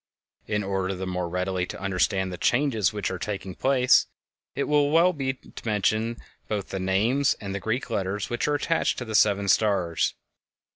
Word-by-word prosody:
In 105 -1 -1
order 95 -1 -1
the 95 +1 -4
more 90 -1 -3
readily 90 0 -1
to - - -7
understand 95 0 0
the - - -5
changes 120 -6 +2
which 105 -3 -3
are 95 - -4
taking 95 -1 -4
place, 130 +3 +3 0.5
it 140 - 0
will 145 -1 +2 0.2
be 135 -4 -3
well 130 - -19
to - - -10
mention 110 +2 0 0.3
both 105 -2 -3
the 95 - -3
names 110 +9 +2
and 100 -2 -5
the 100 - -2
Greek 110 +7 -2
letters 100 -1 -2
which 120 - -2
are 150 - +2
attached 165 +3 0
to 125 - -4
the 110 - -6
seven 100 -2 +3
stars. 95 -5 +2
100 Hz, 185 wpm, -26 LUFS, 95-120 Hz, 0.5 s, place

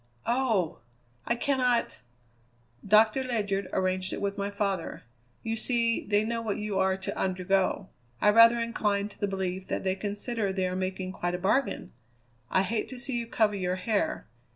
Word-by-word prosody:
Oh! 225 -9 +1 0.5
I 235 - +2
cannot 250 -2 +1 0.4
" 120 0 -37 0.2
"Doctor 225 +4 +2
Ledyard 205 -6 -1
arranged 185 0 0
it - - -3
with 200 0 -1
my 200 0 -2
father. 200 -3 -2 0.4
You 225 0 -1
see, 230 0 0
they 205 +1 +3
know 230 +1 -2
what 220 -3 -2
you 210 -2 -2
are 190 0 +2
to 190 - -5
undergo. 185 0 0 0.3
I 210 - +5
rather 230 +2 +7
incline 210 -3 0
to - - -18
the 205 - 0
belief 190 -1 -3
that - - -2
they 190 -1 +1
consider 205 +2 -2
they 190 -1 0
are 180 - -3
making 185 0 -3
quite 175 -1 -2
a - - -2
bargain. 200 +9 0 0.6
I 190 - +3
hate 220 +3 -2
to 255 - -8
see 265 0 -2
you 235 - -4
cover 220 -2 +2
your 180 -2 -1
hair. 200 +3 -1
200 Hz, 175 wpm, -28 LUFS, 185-230 Hz, 0.6 s, rather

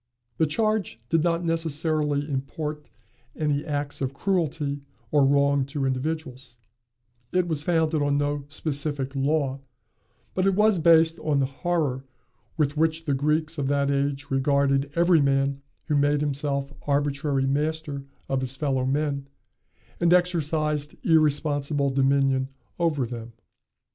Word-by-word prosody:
The 160 - +4
charge 215 - 0
did 165 -1 +2
not 170 0 0
necessarily 155 -3 0
import 150 +2 -4 0.5
any 150 -2 0
acts 145 -1 -3
of 135 0 -2
cruelty 150 -5 -1 0.3
or 145 -2 +4
wrong 140 0 +3
to 140 -1 -2
individuals: 130 -2 -3 0.7
it 180 -1 +1
was 155 -4 -1
founded 160 -1 +1
on 145 0 +2
no 145 0 -1
specific 145 -2 -2
law; 140 -1 0 0.7
but 185 +1 +1
it 195 - +2
was 210 -2 +4
based 165 0 +5
on 150 -2 0
the 135 - +2
horror 140 -2 -1 0.5
with 150 -2 +1
which 160 +1 +1
the 145 - +1
Greeks 155 +3 0
of 135 - 0
that 140 0 +1
age 140 0 -1
regarded 140 0 +2
every 170 -1 +4
man 140 0 +1 0.2
who 150 - 0
made 145 0 +2
himself 140 -1 -1
arbitrary 140 -1 0
master 145 0 -1 0.2
of 135 -1 0
his 130 0 -2
fellow 135 -2 0
men, 140 0 -1 0.7
and 170 0 +4
exercised 155 -4 0
irresponsible 145 -3 +2
dominion 135 0 +2 0.3
over 155 -6 +1
them. 115 -1 -7
145 Hz, 135 wpm, -25 LUFS, 140-160 Hz, 0.7 s, based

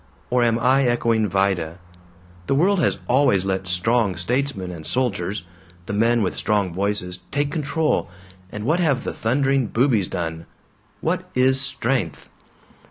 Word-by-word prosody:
Or 125 0 +3
am 115 -1 +3
I 130 +3 +3
echoing 115 -2 +2
Vida? 90 -3 0 0.7
The 135 - +2
world 190 +6 +3
has 155 - +1
always 125 -8 +3
let 95 -1 -2
'strong' 100 +3 +1
statesmen 115 0 -1
and 85 -3 -8
soldiers 100 -3 -2 0.4
the 105 - -4
men 115 +2 +2
with 95 - -1
strong 100 -5 0
voices 95 -1 -2
take 145 0 -1
control, 155 +1 0 0.4
and 105 - -6
what 155 +9 +1
have 145 -7 +1
the - - -3
thundering 135 +2 +1
boobies 115 -5 +2
done? 80 -1 -4 0.5
What - - -2
is 130 +1 +3
'strength'? 125 - -2
115 Hz, 145 wpm, -22 LUFS, 95-135 Hz, 0.7 s, Or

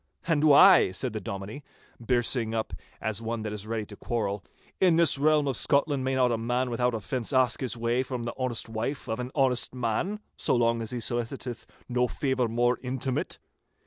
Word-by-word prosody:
'And 155 -3 +1
why,' 155 - +7
said 125 +4 -3
the 110 - -4
Dominie, 100 +7 -6 0.4
birsing 120 -2 +1
up 110 - -2 0.3
as 110 0 -2
one 115 0 -3
that 105 -1 -4
is 105 0 -6
ready 110 -1 -2
to 105 - -11
quarrel, 100 -4 -3 0.4
'in 180 -3 +4
this 165 -4 +4
realm 150 0 +3
of 135 - 0
Scotland 140 +1 +1
may 130 0 0
not 125 -2 +3
a 115 - 0
man 125 +2 -1
without 125 0 +1
offence 115 +2 -3
ask 130 -3 +2
his 125 -2 -3
way, 120 +2 +1
from 125 -2 -4
the 120 - -4
honest 130 -3 -2
wife 115 +5 -4
of 110 - -3
an 125 0 -4
honest 130 -3 +1
man, 125 - -1 0.2
so - - 0
long 115 -1 +2
as 110 - -4
he 125 - -3
soliciteth 120 +1 -3 0.2
no 125 0 +1
favour 130 -2 0
more 120 +2 +1
intimate? 130 0 -3
125 Hz, 195 wpm, -27 LUFS, 115-130 Hz, 0.4 s, why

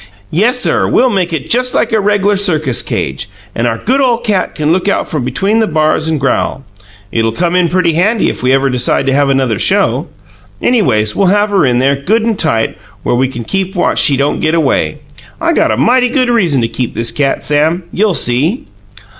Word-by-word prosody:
Yessir, 245 +9 +1
we'll 255 0 +3
make 185 -4 -1
it 160 -4 -4
just 250 +1 0
like - - +1
a 220 - +2
reg'lar 205 0 +1
circus 155 - +1
cage, 65 0 -4 0.2
and 115 +1 -1
our 115 -1 -1
good 260 - 0
ole 245 -3 +2
cat 215 -5 -2
can 155 0 0
look 185 +3 0
out 200 - 0
from 150 -5 -3
between 195 - 0
the 220 - +1
bars 155 -1 0
and 160 -2 -1
growl. 135 0 -1 0.5
It'll 115 0 0
come 170 +9 -1
in 180 -2 +2
pretty 175 -1 +1
handy 205 +7 +1
if - - -3
we 125 +1 +1
ever 135 +1 +2
decide 125 +2 +1
to 135 - +1
have 140 0 +2
another 130 -6 0
show. - - +1 0.5
Anyways, 110 - +1
we'll 195 - +2
have 205 +2 +2
her 195 -8 +2
in 120 -1 +1
there, 135 +3 +2
good 210 +12 0
and 225 -3 -1
tight, 115 -8 0 0.2
where - - 0
we 130 +2 +1
can 120 -3 -7 0.3
watch 175 - +1
she 140 - +3
don't 140 +2 0
get 155 +1 0
away. 135 - 0 0.4
I - - +1
got - - +2
a 110 - 0
mighty 245 - +2
good 255 -1 0
reason 175 - +1
to 115 - 0
keep 120 +1 -4
this 115 0 -1
cat, 140 -2 -1
Sam. 155 +4 +1
You'll 205 -2 0
see." 150 - 0
160 Hz, 210 wpm, -12 LUFS, 130-205 Hz, 0.5 s, we'll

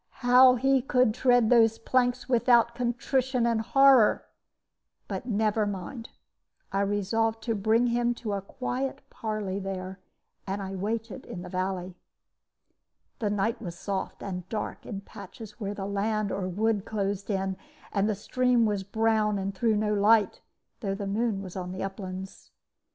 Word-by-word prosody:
How 250 +1 +7
he 270 +2 +3
could 250 -3 +2
tread 245 -2 +3
those 225 -2 +5
planks 245 +1 0
without 235 -1 +4
contrition 250 +1 0
and 230 -1 +1
horror 270 -2 +5 0.8
but 245 - -5
never 215 -1 +1
mind. 205 +4 -6 0.6
I 195 - 0
resolved 220 +3 0
to 230 - 0
bring 220 +3 +2
him 240 0 +1
to 215 -3 -4
a 200 - -2
quiet 255 +5 -4
parley 215 -3 -3
there, 190 -1 -5 0.5
and 195 +1 -2
I 195 -1 -5
waited 215 +3 -3
in 175 - -7
the 180 - -8
valley. 185 0 -3 1.3
"The 215 -4 0
night 210 +3 -1
was 175 -5 -6
soft, 195 0 -4
and 180 -2 -5
dark 215 -2 -5
in 200 -3 -5
patches 210 +2 -11
where 205 -1 -3
the 195 - -4
land 205 +1 -1
or 190 -1 -2
wood 210 +2 0
closed 200 -2 -3
in; 195 -1 -1 0.4
and 200 +1 +1
the 215 - 0
stream 245 +3 +2
was 205 -2 0
brown 215 0 +1
and 195 0 -3
threw 220 +3 +1
no 210 0 +1
light, 210 0 +3 0.4
though 195 -4 -2
the 200 0 -5
moon 205 0 -1
was 185 -2 -9
on 180 -1 -4
the 185 - -4
uplands. 190 -1 -7
215 Hz, 155 wpm, -27 LUFS, 195-235 Hz, 1.3 s, How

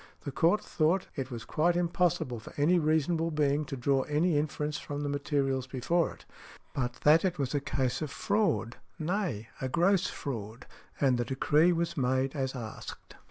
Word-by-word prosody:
The 140 - -4
Court 170 +9 +2
thought 170 +4 +1
that 140 - -2
it - - -20
was 120 -2 -6
quite 170 +3 +1
impossible 170 -8 0
for 110 - -11
any 170 +5 +4
reasonable 160 +1 +1
being 150 -1 +1
to 135 - -5
draw 135 +2 +2
any 155 +3 +2
inference 150 0 -1
from 145 0 -5
the 145 - -2
materials 140 -2 0
before 150 +7 0
it, - - -15 0.5
but 125 -2 -1
that 155 +2 +6
it 185 -2 0
was 140 -2 -2
a 145 - +2
case 130 -1 -1
of 155 - -2
fraud—nay, 155 - -1
a 130 - -1
gross 180 +6 +3
fraud, 115 -3 -6 0.3
and 130 -3 +3
the 120 - 0
decree 150 +6 +3
was 170 0 -1
made 130 +1 +1
as 135 -1 -2
asked. 110 -3 -8
145 Hz, 175 wpm, -30 LUFS, 130-165 Hz, 0.5 s, that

